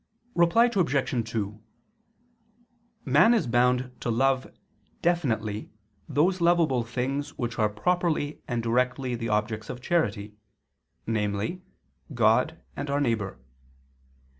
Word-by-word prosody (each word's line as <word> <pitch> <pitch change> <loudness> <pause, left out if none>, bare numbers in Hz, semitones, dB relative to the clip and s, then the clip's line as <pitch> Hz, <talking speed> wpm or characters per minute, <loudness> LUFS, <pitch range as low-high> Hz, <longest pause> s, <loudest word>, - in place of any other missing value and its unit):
Reply 175 +7 +4
Obj. 140 - 0
2: 105 -1 -3 1.4
Man 235 +2 +5
is 225 - +1
bound 125 +2 +2
to - - -3
love 130 +3 +1 0.5
definitely 110 -12 0 0.4
those 180 +5 +2
lovable 165 -8 +3
things 135 +4 -3
which 120 -2 -3
are 105 -1 +3
properly 155 +5 -1
and 120 -2 -2
directly 125 +2 0
the 115 -1 -3
objects 105 +1 -1
of 125 - -5
charity, 110 -10 -1 0.7
namely, 105 - -2 0.5
God 120 +8 +3 0.2
and 145 - -4
our 140 +1 +1
neighbor. 110 - -1
125 Hz, 110 wpm, -27 LUFS, 110-155 Hz, 1.4 s, Man